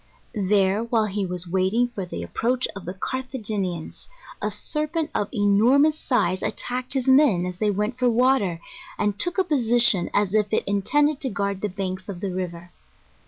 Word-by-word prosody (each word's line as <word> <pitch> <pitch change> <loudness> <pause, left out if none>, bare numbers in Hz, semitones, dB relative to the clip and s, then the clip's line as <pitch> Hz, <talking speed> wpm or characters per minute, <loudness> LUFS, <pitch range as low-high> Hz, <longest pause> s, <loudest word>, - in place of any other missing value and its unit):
There, 200 +1 +3
while 230 -2 +1
he 200 -1 -2
was 180 0 -5
waiting 190 +7 +1
for 200 -6 -6
the - - -5
approach 250 +2 -1
of 195 - -8
the 180 +3 -5
Carthagenians, 210 -8 -4 0.3
a - - 0
serpent 305 +1 -2
of 205 - -1
enormous 240 +8 +4
size 185 -8 0
attacked 250 +1 -2
his 265 -2 -1
men 260 -10 +5
as 180 0 -6
they 215 - +2
went 210 +5 -2
for 250 -1 +3
water, 235 -7 +2 0.4
and 205 -1 -1
took 350 +7 0
a 380 - +4
position 240 - +3
as 205 -1 +1
if 210 -2 +1
it - - +1
in 200 0 0
tended 295 +6 +1
to 265 - -1
guard 200 -2 -2
the 210 - -1
banks 190 0 -5
of 185 -3 -6
the 190 -1 -3
river. 175 -1 -5
210 Hz, 180 wpm, -24 LUFS, 190-255 Hz, 0.4 s, men